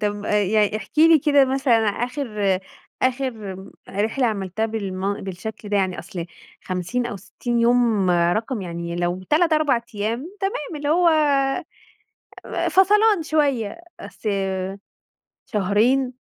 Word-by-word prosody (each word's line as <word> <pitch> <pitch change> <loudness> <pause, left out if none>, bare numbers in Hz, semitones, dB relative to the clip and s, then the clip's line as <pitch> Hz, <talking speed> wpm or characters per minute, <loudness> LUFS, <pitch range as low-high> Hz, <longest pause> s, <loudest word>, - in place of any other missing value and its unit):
طب 205 -1 -2
آآ - - -2
يع 210 +1 +2
احكِ 195 -3 -9
لي 325 0 +7
كده 285 -1 +4
مثلًا 260 -4 +2
آخر 210 -4 -1 0.4
آخر 260 +1 +1 0.2
آمم، 190 +1 -10 0.2
رحلة 220 +6 0
عملتها 205 0 -2
بالم 200 -3 -3
بالشكل 195 +3 -7
ده 205 - +1
يعني 190 -2 0
أصل 170 -3 -6 0.4
50 185 +7 -2
أو 210 - -5
60 235 +5 -3
يوم، 230 -5 +3
رقم 195 +7 +1
يعني 170 -1 -5
لو 175 +1 -1
3، 325 +2 +3
4 305 -6 +3
أيام 235 - -3
تمام 345 -6 -3
اللي 290 0 -3
هو 340 +3 +4
آآ 295 0 +1 0.9
فَصَلان 415 0 +4
شوية، 290 -5 0 0.2
أصل 200 +2 -6 1.2
شهرين؟! 225 +6 +1
225 Hz, 130 wpm, -22 LUFS, 195-280 Hz, 1.2 s, لي